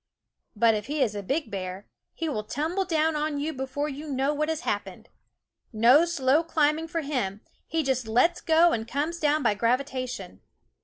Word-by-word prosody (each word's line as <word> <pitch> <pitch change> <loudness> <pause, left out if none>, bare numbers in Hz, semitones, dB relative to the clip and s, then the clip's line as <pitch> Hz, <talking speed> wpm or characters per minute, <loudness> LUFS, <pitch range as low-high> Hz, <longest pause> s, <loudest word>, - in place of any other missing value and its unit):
But 225 +1 +4
if 210 -1 -3
he 295 -1 +1
is 220 -5 -1
a 205 - -4
big 280 - -2
bear, 190 0 -5 0.3
he 330 - -3
will 220 -9 -2
tumble 315 - -2
down 320 -2 +1
on 300 -1 -1
you 310 +2 -2
before 265 +2 -3
you 295 +1 -7
know 270 +2 +1
what 305 +1 -1
has 320 0 -2
happened. - - -4 0.6
No 245 +8 +5
slow 295 -3 +2
climbing 315 0 +1
for 330 0 -2
him; 245 -9 -2 0.3
he 325 -1 0
just 260 -4 -1
lets 250 +10 +2
go 330 +1 +4
and 225 -4 -2
comes 305 +7 -2
down 300 -1 +2
by 225 - +3
gravitation. 245 - -2
280 Hz, 185 wpm, -26 LUFS, 235-315 Hz, 0.6 s, No